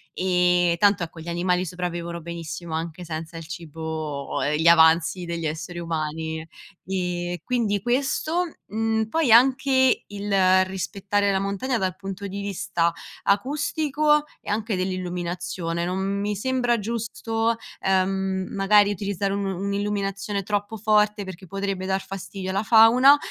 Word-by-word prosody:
e 180 Hz, -1 st, +3 dB
tanto 200 Hz, 0 st, +4 dB
ecco 165 Hz, 0 st, -8 dB
gli 170 Hz, -, -11 dB
animali 180 Hz, +1 st, 0 dB
sopravvivono 170 Hz, -1 st, -4 dB
benissimo 165 Hz, -1 st, -6 dB
anche 165 Hz, +2 st, -4 dB
senza 160 Hz, +1 st, -6 dB
il 165 Hz, -, -8 dB
cibo 160 Hz, -3 st, -4 dB
ehm, 150 Hz, +1 st, +1 dB
gli 165 Hz, -, +3 dB
avanzi 165 Hz, +1 st, +5 dB
degli 170 Hz, -1 st, -4 dB
esseri 170 Hz, +3 st, -5 dB
umani. 160 Hz, -1 st, -3 dB, 0.4 s
Mhmm, 180 Hz, -2 st, -2 dB
quindi 225 Hz, -6 st, 0 dB
questo, 280 Hz, -, 0 dB, 0.2 s
mhmm, 220 Hz, 0 st, 0 dB
poi 315 Hz, -5 st, +2 dB
anche 260 Hz, +1 st, +5 dB
il 195 Hz, -2 st, +3 dB
rispettare 200 Hz, +1 st, -1 dB
la 190 Hz, -, +1 dB
montagna, 200 Hz, +6 st, -1 dB
dal 185 Hz, -2 st, -1 dB
punto 195 Hz, +1 st, -6 dB
di 200 Hz, +1 st, -5 dB
vista 170 Hz, -4 st, -1 dB, 0.3 s
acustico 295 Hz, +6 st, +1 dB, 0.2 s
e -, -, -5 dB
anche 215 Hz, 0 st, -1 dB
dell'illuminazione. 175 Hz, -2 st, -3 dB
Non 180 Hz, +1 st, -2 dB, 0.2 s
mi 210 Hz, 0 st, -1 dB
sembra 245 Hz, +2 st, +1 dB
giusto, 225 Hz, +1 st, -1 dB, 0.3 s
ehm, 190 Hz, 0 st, 0 dB
magari 205 Hz, +1 st, +4 dB
utilizzare 200 Hz, 0 st, -2 dB
un 200 Hz, 0 st, -2 dB
illuminazione 200 Hz, 0 st, -2 dB
troppo 205 Hz, +2 st, -2 dB
forte 210 Hz, 0 st, +2 dB
perché 190 Hz, -1 st, -9 dB
potrebbe 195 Hz, 0 st, -3 dB
dare 190 Hz, 0 st, 0 dB
fastidio 195 Hz, 0 st, -6 dB
alla 195 Hz, +2 st, 0 dB
fauna, 240 Hz, +6 st, +7 dB
190 Hz, 135 wpm, -24 LUFS, 175-210 Hz, 0.4 s, fauna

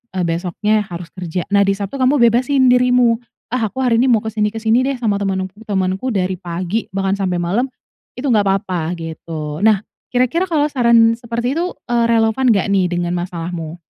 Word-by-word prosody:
eee, 185 Hz, -, 0 dB
besoknya 185 Hz, +5 st, 0 dB
harus 175 Hz, -1 st, -7 dB
kerja. 180 Hz, -1 st, -3 dB
Nah, 200 Hz, 0 st, +5 dB
di 195 Hz, -, +2 dB
Sabtu 200 Hz, +4 st, -5 dB
kamu 260 Hz, +3 st, +3 dB
bebasin 255 Hz, +3 st, +2 dB
dirimu, 250 Hz, -2 st, +3 dB, 0.3 s
"Ah, 230 Hz, -3 st, 0 dB
aku 265 Hz, -, -7 dB
hari 235 Hz, -2 st, +3 dB
ini 260 Hz, -, +3 dB
mau 220 Hz, -2 st, +3 dB
ke 220 Hz, -, -4 dB
sini 210 Hz, -1 st, 0 dB
ke 225 Hz, -, -6 dB
sini 225 Hz, +3 st, +2 dB
deh, 275 Hz, -, -1 dB
sama 215 Hz, -4 st, +1 dB
teman-temanku 195 Hz, +1 st, -2 dB
dari 190 Hz, -2 st, 0 dB
pagi, 180 Hz, +5 st, -3 dB
bahkan 195 Hz, 0 st, 0 dB
sampai 185 Hz, -3 st, -1 dB
malam." 200 Hz, +10 st, 0 dB, 0.5 s
itu, 280 Hz, -, -3 dB
nggak 210 Hz, -6 st, +3 dB
papa, 185 Hz, -4 st, -1 dB
gitu. 160 Hz, 0 st, -6 dB
Nah, 215 Hz, -2 st, +4 dB, 0.3 s
kira-kira 255 Hz, +9 st, +2 dB
kalau 300 Hz, -3 st, +1 dB
saran 235 Hz, -4 st, +4 dB
seperti 235 Hz, +3 st, -3 dB
itu, 355 Hz, +2 st, -1 dB, 0.2 s
eee, 235 Hz, -1 st, +2 dB
relevan 230 Hz, +3 st, +2 dB
nggak 200 Hz, -3 st, +2 dB
nih, 190 Hz, -2 st, +3 dB
dengan 175 Hz, 0 st, -1 dB
masalahmu? 175 Hz, -1 st, -5 dB
210 Hz, 185 wpm, -18 LUFS, 180-240 Hz, 0.5 s, Nah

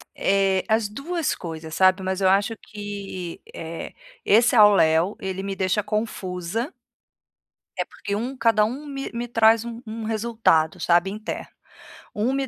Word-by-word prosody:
Eh, 195 Hz, -1 st, +2 dB
as 220 Hz, -1 st, +1 dB
duas 320 Hz, +8 st, -2 dB
coisas, 160 Hz, -2 st, -7 dB
sabe. 185 Hz, +2 st, +4 dB
Mas 190 Hz, +1 st, -2 dB
eu 190 Hz, -, +4 dB
acho 200 Hz, +4 st, +2 dB
que 200 Hz, -4 st, -7 dB
eh, 165 Hz, 0 st, -7 dB, 0.3 s
esse 235 Hz, +4 st, +5 dB
ao 210 Hz, -2 st, +8 dB
léo, 165 Hz, +2 st, +3 dB
ele 190 Hz, 0 st, -4 dB
me 195 Hz, 0 st, -3 dB
deixa 190 Hz, +2 st, 0 dB
confusa 210 Hz, -, -3 dB, 1.0 s
É, -, -, 0 dB
porque 200 Hz, -, -5 dB
um 245 Hz, +6 st, -3 dB
cada 225 Hz, -3 st, +3 dB
um 260 Hz, +7 st, -5 dB
me 275 Hz, -1 st, -5 dB
me 240 Hz, +1 st, -3 dB
traz 225 Hz, -1 st, +4 dB
um 235 Hz, 0 st, -7 dB
um 220 Hz, +1 st, -6 dB
resultado, 220 Hz, -8 st, +1 dB
sabe, 175 Hz, +2 st, +3 dB
interno. 215 Hz, +2 st, -6 dB, 0.7 s
Um 225 Hz, +5 st, 0 dB
me 270 Hz, 0 st, -1 dB
210 Hz, 155 wpm, -24 LUFS, 190-230 Hz, 1.0 s, ao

